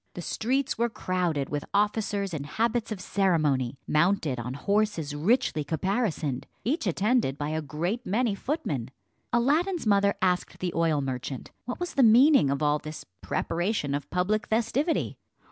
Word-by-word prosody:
The 175 - -5
streets 255 +6 -1
were 235 0 +2
crowded 175 -9 -1
with 145 -1 -3
officers 205 -2 0
in 145 -3 -4
habits 230 +7 -1
of 210 - -3
ceremony, 155 -11 +1
mounted 155 -5 +2
on 125 +2 -4
horses 200 -3 0
richly 170 - +1
caparisoned, 160 - -1 0.2
each 260 - 0
attended 195 - +1
by 145 0 -2
a 155 +1 -1
great 170 - -3
many 225 +1 +1
footmen. 190 - -3 0.4
Aladdin's 310 +9 +2
mother 200 -1 +3
asked 180 -1 0
the 180 -2 -3
oil 160 -3 +2
merchant 130 -1 -5
what 245 - -5
was 355 0 -3
the 275 - +3
meaning 245 - +6
of 140 +2 -1
all 150 0 +2
this 155 +1 -8 0.2
preparation 175 -4 -1
of 145 0 -3
public 210 +6 0
festivity. 240 +9 0
185 Hz, 150 wpm, -27 LUFS, 150-230 Hz, 0.4 s, meaning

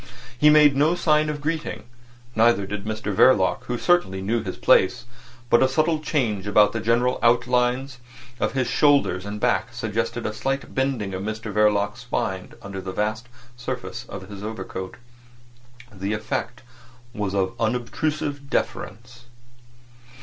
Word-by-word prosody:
He 150 +5 +5
made 150 -2 +6
no 150 +5 +3
sign 155 -3 +2
of 150 -1 -4
greeting; 155 +1 -3 0.5
neither 110 -3 +4
did 105 +1 -5
Mr 110 -1 -3
Verloc, 95 -2 +4
who 120 - -2
certainly 175 - +2
knew 110 +5 -1
his - - -6
place; - - +3 0.4
but 120 - +4
a 130 - +5
subtle 155 +3 +1
change 115 - -1
about 105 0 +5
the 115 - -2
general 120 +3 +1
outlines 125 +2 +1 0.4
of - - 0
his 130 -2 0
shoulders 140 -11 +2
and 105 +1 -5
back - - +1
suggested - - -2
a 110 - -2
slight 135 +5 -3
bending 130 -7 -1
of 95 - -4
Mr 110 +1 -5
Verloc's 105 0 +2
spine 115 -6 -3
under 100 -1 -6
the 95 - -5
vast 110 +4 -2 0.3
surface 125 -1 -6
of 95 -1 -8
his 100 -1 -9
overcoat. 95 -3 -6 1.0
The 100 +2 -3
effect 120 +3 -4 0.5
was 105 -3 -3
of 95 -1 0
unobtrusive 140 +5 -2
deference. 120 +4 -4
115 Hz, 145 wpm, -23 LUFS, 105-135 Hz, 1.0 s, made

